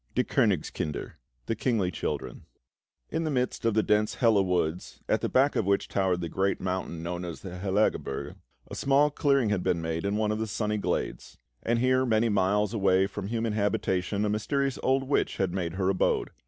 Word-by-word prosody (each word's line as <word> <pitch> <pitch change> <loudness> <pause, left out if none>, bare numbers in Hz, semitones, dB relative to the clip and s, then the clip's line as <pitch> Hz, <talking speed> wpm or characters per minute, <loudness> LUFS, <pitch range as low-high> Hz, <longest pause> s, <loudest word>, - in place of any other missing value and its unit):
DIE 125 - +3
KÖNIGSKINDER 95 - -1 0.3
(The 115 - -1
Kingly 110 -9 0
Children) 65 -7 -4 0.6
In 165 - -1
the 155 - -1
midst 125 -3 -1
of 115 -2 +2
the 110 - +3
dense 105 0 +1
Hella 115 -5 +4
Woods, 90 -7 -1
at - - +1
the - - -1
back 135 +2 +3
of 100 - 0
which 100 0 +1
towered 95 -3 0
the 85 - -2
great 95 +3 0
mountain 90 -3 -3
known 90 +1 -4
as 85 -2 -6
the 90 -2 -7
Hellagebirge, 95 -7 0 0.4
a - - -5
small 140 +2 +3
clearing 140 -5 +2
had 105 -3 0
been 85 - 0
made 80 +1 -3
in 100 +1 0
one 105 0 +1
of 105 - -2
the 110 - -2
sunny 105 0 -1
glades; - - -3 0.2
and 120 +1 +1
here, 130 +2 +3
many 115 -2 +2
miles 105 +1 +1
away 95 -3 +3
from 100 0 -5
human 115 0 -1
habitation, 100 -1 0
a - - 0
mysterious 135 +6 -1
old 135 +1 +2
witch 135 +2 0
had 95 -3 0
made 85 -3 -2
her 95 0 -1
abode. 95 - +1
105 Hz, 195 wpm, -28 LUFS, 95-115 Hz, 0.6 s, Hella